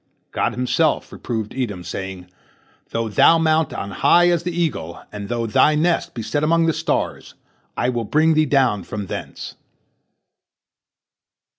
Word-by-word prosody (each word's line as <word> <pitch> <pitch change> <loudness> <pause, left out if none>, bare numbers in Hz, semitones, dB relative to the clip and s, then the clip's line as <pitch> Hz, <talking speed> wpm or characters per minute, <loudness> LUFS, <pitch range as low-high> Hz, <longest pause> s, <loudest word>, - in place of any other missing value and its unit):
God - - 0
Himself 125 +5 0
reproved 110 -3 -4
Edom, 105 -9 -3
saying, 95 0 -6 0.6
"Though 115 0 -2
thou 135 +9 +5
mount 160 -1 +2
on 100 - -5
high 175 - +4
as 170 -2 +2
the 175 +1 -3
eagle, 155 - -2
and 100 -1 -7
though 120 -1 -1
thy 130 +7 +3
nest 165 +3 0
be 115 - -4
set 145 +6 -1
among 165 +2 +3
the 165 - +2
stars, - - -2 0.4
I 125 - +1
will 120 -2 -2
bring 155 +7 +3
thee 155 0 +2
down 130 -7 +2
from 105 -1 -5
thence." - - -7
130 Hz, 150 wpm, -21 LUFS, 105-160 Hz, 0.6 s, thou